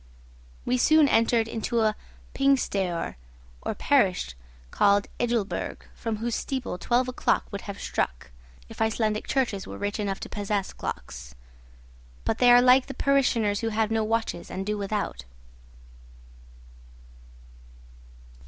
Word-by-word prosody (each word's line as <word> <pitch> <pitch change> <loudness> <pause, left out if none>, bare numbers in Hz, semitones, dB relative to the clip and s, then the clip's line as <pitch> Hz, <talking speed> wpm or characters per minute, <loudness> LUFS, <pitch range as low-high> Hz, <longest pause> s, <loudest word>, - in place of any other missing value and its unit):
We 250 +1 +1
soon 310 +3 +5
entered 230 -2 +3
into 230 +1 -1
a 215 -1 +2 0.4
'pingstaoer' 200 - 0 0.4
or - - -3
parish 60 -1 +2 0.4
called 200 0 +3
Ejulberg, 235 -4 -2
from 225 -1 -3
whose 230 +1 -2
steeple 260 -9 -3
twelve 245 +1 +1
o'clock 255 - 0
would 200 -1 -5
have 200 - -6
struck, 60 -1 -3 0.4
if - - -9
Icelandic 220 -1 0
churches 240 -8 -1
were - - -7
rich 205 +1 -3
enough 200 -2 -2
to - - -5
possess 205 -1 -2
clocks. 60 -1 -7 0.9
But - - 0
they 245 -1 +6
are 245 0 +7
like 255 +1 +6
the 270 - -7
parishioners 235 -7 +2
who 225 - -1
have 220 0 0
no 225 -1 +1
watches 225 -5 -2
and 190 +1 -4
do 210 +1 -1
without. 200 - -3
220 Hz, 130 wpm, -26 LUFS, 200-245 Hz, 0.9 s, are